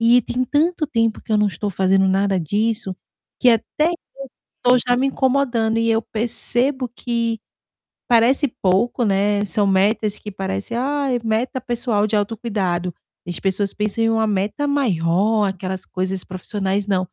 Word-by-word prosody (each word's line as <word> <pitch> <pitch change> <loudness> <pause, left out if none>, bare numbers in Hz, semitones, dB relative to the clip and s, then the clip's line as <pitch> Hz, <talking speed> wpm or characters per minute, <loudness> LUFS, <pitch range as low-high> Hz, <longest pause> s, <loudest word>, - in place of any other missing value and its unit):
e 235 +1 +5
tem 250 +3 -2
tanto 310 +4 +1
tempo 230 -3 0
que - - -15
eu - - +4
não 210 -1 +3
estou 200 +4 -4
fazendo 190 +1 +2
nada 195 0 +2
disso, 205 +2 -1 0.4
que 250 - +5
até 300 +8 +1
eu - - -2 0.7
tô 250 0 +5
já 245 +1 +1
me 265 +2 +2
incomodando 250 -5 +1
e 230 0 +2
eu 225 - +3
percebo 245 +4 -1
que 230 -1 -2 0.7
parece 245 +5 +4
pouco, 230 +4 +1
né, 205 +1 +1
são 200 +2 +1
metas 205 +2 +2
que 210 - -8
parecem 195 +4 -4
"Ai, 275 -1 0
meta 230 +4 -1
pessoal 240 -4 0
de 215 - -3
autocuidado", 200 -5 -2 0.3
as 175 - -3
pessoas 195 +1 +1
pensam 210 +2 -1
em 225 - +3
uma 225 -1 +2
meta 210 +8 -1
maior, 210 - +2
aquelas 190 0 -4
coisas 185 0 -3
profissionais, 195 +1 -2
não. 195 -2 +1
220 Hz, 160 wpm, -21 LUFS, 195-240 Hz, 0.7 s, e